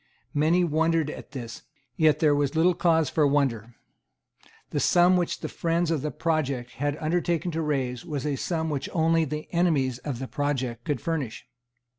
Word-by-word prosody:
Many 160 Hz, +5 st, +3 dB
wondered 160 Hz, -1 st, +1 dB
at -, -, -10 dB
this; 120 Hz, -5 st, -7 dB, 0.3 s
yet 155 Hz, -2 st, +4 dB
there 155 Hz, -2 st, +3 dB
was 145 Hz, +1 st, 0 dB
little 170 Hz, +3 st, +4 dB
cause 165 Hz, -3 st, +2 dB
for 150 Hz, +1 st, +2 dB
wonder. 120 Hz, -5 st, 0 dB, 1.0 s
The -, -, 0 dB
sum 180 Hz, +1 st, +4 dB
which 175 Hz, -2 st, -1 dB
the -, -, -3 dB
friends 170 Hz, 0 st, 0 dB
of 155 Hz, -4 st, 0 dB
the 150 Hz, -, -2 dB
project 140 Hz, -7 st, -1 dB
had 145 Hz, +1 st, -2 dB
undertaken 170 Hz, +2 st, 0 dB
to 165 Hz, 0 st, -2 dB
raise 130 Hz, -5 st, -1 dB
was 145 Hz, -4 st, -4 dB
a 145 Hz, -2 st, 0 dB
sum 160 Hz, +2 st, -2 dB
which 140 Hz, -2 st, -3 dB
only 165 Hz, -1 st, +3 dB
the 150 Hz, +1 st, -5 dB
enemies 145 Hz, -8 st, +1 dB
of 135 Hz, -2 st, -4 dB
the 130 Hz, +2 st, -5 dB
project 130 Hz, -5 st, -2 dB
could 145 Hz, -6 st, -1 dB
furnish. 145 Hz, -11 st, -3 dB
150 Hz, 175 wpm, -26 LUFS, 135-165 Hz, 1.0 s, yet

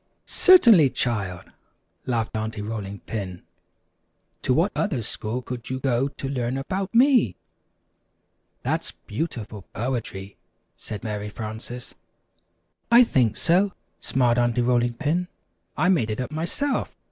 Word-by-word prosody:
"Certainly, 230 Hz, -, +7 dB
child," 100 Hz, -9 st, -3 dB, 0.6 s
laughed 115 Hz, -3 st, -1 dB
Aunty 110 Hz, -1 st, -3 dB
Rolling 105 Hz, -2 st, -5 dB
Pin. 95 Hz, -5 st, -5 dB, 1.0 s
"To -, -, 0 dB
what 165 Hz, +10 st, +3 dB
other 145 Hz, -, 0 dB
school 115 Hz, +3 st, -4 dB
could 120 Hz, -1 st, -6 dB
you 130 Hz, 0 st, -2 dB
go 130 Hz, 0 st, +1 dB
to 140 Hz, -1 st, -6 dB
learn 130 Hz, -1 st, -2 dB
about 190 Hz, +9 st, -3 dB
me?" 245 Hz, -, +5 dB, 1.3 s
"That's -, -, -2 dB
beautiful 110 Hz, -5 st, -4 dB
poetry," 105 Hz, -5 st, -4 dB, 0.4 s
said 105 Hz, +1 st, -7 dB
Mary 105 Hz, -2 st, -4 dB
Frances. 110 Hz, +3 st, -7 dB, 1.0 s
"I 240 Hz, +1 st, +9 dB
think 125 Hz, -, +2 dB
so," 185 Hz, +3 st, +3 dB, 0.3 s
smiled 125 Hz, -2 st, +2 dB
Aunty 120 Hz, 0 st, +2 dB
Rolling 120 Hz, -1 st, +2 dB
Pin; 160 Hz, +7 st, 0 dB, 0.5 s
"I -, -, +2 dB
made 160 Hz, -12 st, +3 dB
it 110 Hz, -, -3 dB
up 125 Hz, +2 st, -3 dB
myself. 170 Hz, -, -2 dB
120 Hz, 125 wpm, -24 LUFS, 110-155 Hz, 1.3 s, I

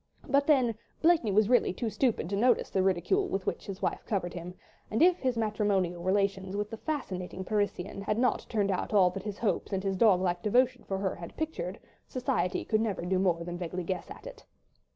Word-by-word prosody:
But 280 Hz, 0 st, +2 dB
then 260 Hz, -6 st, +4 dB, 0.3 s
Blakeney 320 Hz, -10 st, +4 dB
was 210 Hz, +1 st, +4 dB
really 245 Hz, +1 st, +3 dB
too 225 Hz, +2 st, -3 dB
stupid 235 Hz, -, 0 dB
to -, -, +1 dB
notice 240 Hz, +3 st, +2 dB
the 190 Hz, -, +2 dB
ridicule 195 Hz, -, +1 dB
with 195 Hz, -, -3 dB
which -, -, -3 dB
his 195 Hz, -2 st, -5 dB
clever -, -, +1 dB
wife -, -, -12 dB
covered 180 Hz, -5 st, -1 dB
him, 175 Hz, +1 st, -7 dB, 0.3 s
and 220 Hz, -, -1 dB
if 355 Hz, +3 st, +5 dB
his 255 Hz, -3 st, 0 dB
matrimonial 205 Hz, -5 st, 0 dB
relations 190 Hz, 0 st, 0 dB
with 205 Hz, +1 st, -2 dB
the 225 Hz, -, -5 dB
fascinating 190 Hz, -, -4 dB
Parisienne 200 Hz, -2 st, -2 dB
had 210 Hz, +2 st, -1 dB
not 250 Hz, +1 st, +1 dB
turned 205 Hz, -3 st, +1 dB
out 185 Hz, -, -2 dB
all 185 Hz, -3 st, +6 dB
that 195 Hz, +1 st, -5 dB
his 205 Hz, 0 st, -5 dB
hopes 220 Hz, -1 st, -1 dB
and 190 Hz, -1 st, -1 dB
his 195 Hz, -1 st, 0 dB
dog 195 Hz, -2 st, +5 dB
like 175 Hz, -1 st, 0 dB
devotion 250 Hz, +3 st, +2 dB
for 195 Hz, -, -2 dB
her 190 Hz, -1 st, -1 dB
had 170 Hz, -1 st, -10 dB
pictured, 215 Hz, -, -3 dB, 0.3 s
society 250 Hz, -7 st, -1 dB
could 215 Hz, -1 st, +1 dB
never 205 Hz, -6 st, -2 dB
do 185 Hz, +1 st, +1 dB
more 175 Hz, -3 st, +1 dB
than 175 Hz, 0 st, -6 dB
vaguely 180 Hz, +1 st, -4 dB
guess 185 Hz, +1 st, -4 dB
at -, -, -11 dB
it. -, -, -10 dB
200 Hz, 215 wpm, -29 LUFS, 185-235 Hz, 0.3 s, all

